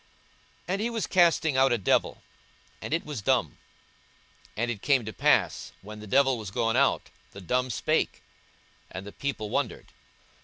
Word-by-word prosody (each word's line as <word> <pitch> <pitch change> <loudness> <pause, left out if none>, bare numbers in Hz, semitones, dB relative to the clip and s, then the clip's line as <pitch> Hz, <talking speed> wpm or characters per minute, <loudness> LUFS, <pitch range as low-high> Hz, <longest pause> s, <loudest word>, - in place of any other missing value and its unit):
42:011:014 - - -34
And 195 +2 0
he 230 - 0
was 230 -2 -2
casting 165 -5 +3
out 135 0 +4
a 120 - +3
devil, 100 - +1 0.6
and - - -6
it 165 +2 0
was 145 -7 -5
dumb. - - 0 1.0
And 120 +2 0
it 105 -4 -6
came 135 -5 +2
to 110 - -6
pass, - - +1
when 105 +2 -9
the 105 - -10
devil 135 +1 +3
was 105 -3 -6
gone 115 +3 0
out, 140 +2 +2 0.2
the 100 - -9
dumb 125 +7 0
spake; 115 - -1 0.7
and 95 +1 -7
the 100 - -8
people 110 -6 -4
wondered. - - -2
125 Hz, 170 wpm, -27 LUFS, 105-140 Hz, 1.0 s, out